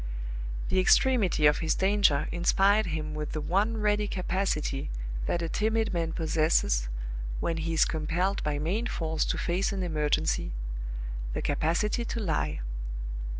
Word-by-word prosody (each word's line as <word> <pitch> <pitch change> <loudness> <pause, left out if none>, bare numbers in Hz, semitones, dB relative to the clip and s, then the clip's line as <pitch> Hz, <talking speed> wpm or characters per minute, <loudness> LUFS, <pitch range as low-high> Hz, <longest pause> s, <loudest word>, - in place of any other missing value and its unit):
The 190 - +2
extremity 195 - +4
of 150 0 +5
his 160 -1 +1
danger 195 -7 +3
inspired 195 +4 +3
him 155 -2 -3
with 150 -1 -4
the 155 - -2
one 200 +8 +1
ready 210 -1 +1
capacity 185 -7 -1 0.4
that 170 - 0
a - - -1
timid 220 +3 0
man 165 -2 -1
possesses 155 - +1 0.5
when 165 - -1
he 165 +1 -2
is - - +5
compelled 170 +5 -1
by 150 -1 0
main 190 +11 -1
force 160 -5 -1
to - - -1
face 180 +3 0
an 195 -2 -2
emergency 150 - 0 0.8
the - - -2
capacity 170 - 0
to 235 - -3
lie. 160 - -1
170 Hz, 145 wpm, -28 LUFS, 155-200 Hz, 0.8 s, of